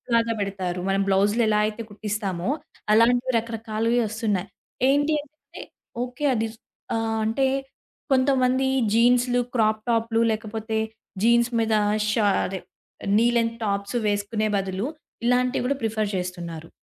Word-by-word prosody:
లాగా 230 0 +2
పెడతారు. 190 -3 -2
మనం 195 0 +2
బ్లౌజులు 200 +4 +3
ఎలా 210 -1 +3
అయితే 215 +2 -3
కుట్టిస్తామో, 205 -2 -3 0.4
అలాంటివి 245 +3 +4
రకరకాలువి 225 +1 -1
వస్తున్నాయి. 210 -3 -1 0.4
ఏంటి 290 +3 +3
అంటే 305 +1 -14 0.4
ఓకే 250 +4 -4
అది 225 -1 0 0.5
ఆహ్, 225 0 -1
అంటే 245 +5 +1 0.7
కొంతమంది 260 0 +3 0.3
జీన్సులు, 245 +1 +4
క్రాప్ 215 -2 +2
టాపులు 230 0 +1
లేకపోతే 220 0 -3 0.4
జీన్స్ 235 +1 +4
మీద 225 -1 +1 0.4
షా 210 -1 +2 0.2
అదే 190 0 -4 0.6
నీ 230 +2 +4
లెన్త్ 230 0 0
టాప్స్ 200 +2 -1
వేసుకునే 210 +1 0
బదులు, 195 +4 -2 0.4
ఇలాంటివి 250 +1 +2
కూడా 280 - +1
ప్రిఫర్ 215 -1 0
చేస్తున్నారు. 170 -3 -5
225 Hz, 120 wpm, -24 LUFS, 205-245 Hz, 0.7 s, అలాంటివి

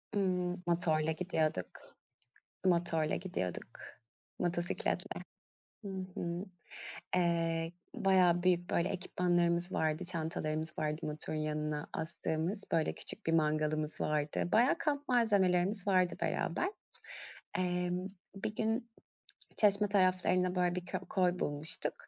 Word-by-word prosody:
Imm, 180 -3 +1
motorla 160 -2 +2
gidiyorduk. 155 - -2 0.7
Motorla 170 -3 +2
gidiyorduk. 95 - -4 0.6
Motosikletle. 175 0 -1 0.6
Hı 200 - -4 0.2
hı. 170 +2 -3 0.7
Eee, 165 -2 +1 0.2
bayağı 180 -2 +4
büyük 175 -1 +2
böyle 170 +2 +1
ekipmanlarımız 175 -1 +1
vardı, 155 -1 0
çantalarımız 160 -2 -2
vardı 150 +1 -2
motorun 155 +1 -3
yanına 150 -1 -2
astığımız. 165 +4 -1
Böyle 160 -1 +1
küçük - - -4
bir 165 - +1
mangalımız 155 -1 +1
vardı. 150 +2 0
Bayağı 250 +8 +5
kamp 290 -2 -1
malzemelerimiz 200 -4 +3
vardı 185 -2 +3
beraber. 360 - 0 0.9
Emm, 180 0 0 0.3
bir 200 +2 -4
gün 225 +2 -1 0.7
Çeşme 205 0 +5
taraflarında 185 -2 +3
böyle 180 -1 +2
bir 180 -1 -4
kö 185 +1 -3
koy 180 -1 0
bulmuştuk. 145 +2 0
175 Hz, 105 wpm, -33 LUFS, 160-185 Hz, 0.9 s, Bayağı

